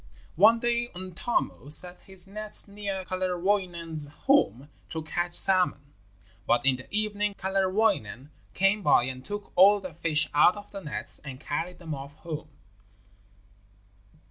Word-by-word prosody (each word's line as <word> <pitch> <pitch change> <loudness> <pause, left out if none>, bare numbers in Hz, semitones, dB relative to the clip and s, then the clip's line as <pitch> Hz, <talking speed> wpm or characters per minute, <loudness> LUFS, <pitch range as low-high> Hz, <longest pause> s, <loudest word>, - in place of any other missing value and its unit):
One 215 +7 +5
day 240 +1 -1
Untamo 185 -3 -4
set 180 +3 +4
his 190 -2 -11
nets 215 +2 +2
near 200 -2 -6
Kalerwoinen's 180 -4 -3 0.2
home 270 - +2 0.2
to 160 -1 -6
catch 175 +2 -2
salmon, 180 -7 +6 0.5
but 120 +1 +1
in 135 -2 +2
the 130 - -12
evening 210 -1 -1
Kalerwoinen 190 - -1 0.2
came 195 +2 +1
by 145 -8 +3
and 130 0 -6
took 205 +6 -8
all 200 +3 +6
the 185 -3 -9
fish 160 -1 -1
out 150 +5 +4
of 205 0 -12
the 195 - -8
nets 150 - -2
and 135 -3 -10
carried 175 +3 -5
them 165 -3 -7
off 140 0 -9
home. 155 -1 -8
180 Hz, 140 wpm, -26 LUFS, 155-205 Hz, 0.5 s, salmon